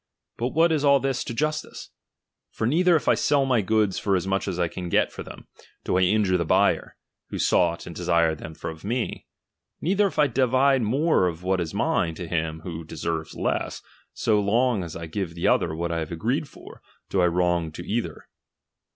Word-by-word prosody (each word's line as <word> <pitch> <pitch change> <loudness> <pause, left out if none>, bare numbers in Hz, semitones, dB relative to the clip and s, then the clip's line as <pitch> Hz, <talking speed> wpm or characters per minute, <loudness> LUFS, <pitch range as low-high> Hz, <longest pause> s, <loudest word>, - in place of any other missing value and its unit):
But 120 - -1
what 165 +5 +3
is 155 -2 +1
all 140 -1 +5
this 135 -1 -1
to - - -5
justice? 155 +4 -3 0.6
For 110 - -3
neither 170 +8 +4
if 155 - -1
I - - +6
sell 140 -2 +2
my 125 -4 +2
goods 105 -1 +1
for 100 -2 +1
as 90 - -1
much 95 +1 -1
as 95 -3 -2
I 90 -1 +1
can 90 +1 -6
get - - +2
for - - -8
them, - - -11 0.4
do - - -1
I 95 - +3
injure 95 0 +3
the 85 - 0
buyer, 80 - +1 0.3
who - - -5
sought 85 -1 +2
and 85 - -9
desired 85 -3 +1
them 80 - -8
of 80 -1 -6
me; 115 +4 -3 0.5
neither 200 +4 +2
if - - -8
I 150 - +5
divide 130 +1 +3
more 130 - +2
of 85 0 -5
what 95 0 +1
is 80 -2 -4
mine 80 -1 0
to 90 -1 -6
him 80 -1 -2
who 85 -1 -6
deserves 80 0 -4
less, - - -2 0.3
so 105 -2 +1
long 115 +1 +1
as 85 -2 -7
I 85 - -6
give 85 0 -4
the 85 - -1
other 80 - +2
what 85 +1 -2
I 85 - -1
have 80 0 -5
agreed 125 - -1
for, - - -14 0.3
do 95 - +2
I 90 - +4
wrong 85 -2 +1
to 85 - -8
either. 115 +2 -3
95 Hz, 210 wpm, -25 LUFS, 85-130 Hz, 0.6 s, I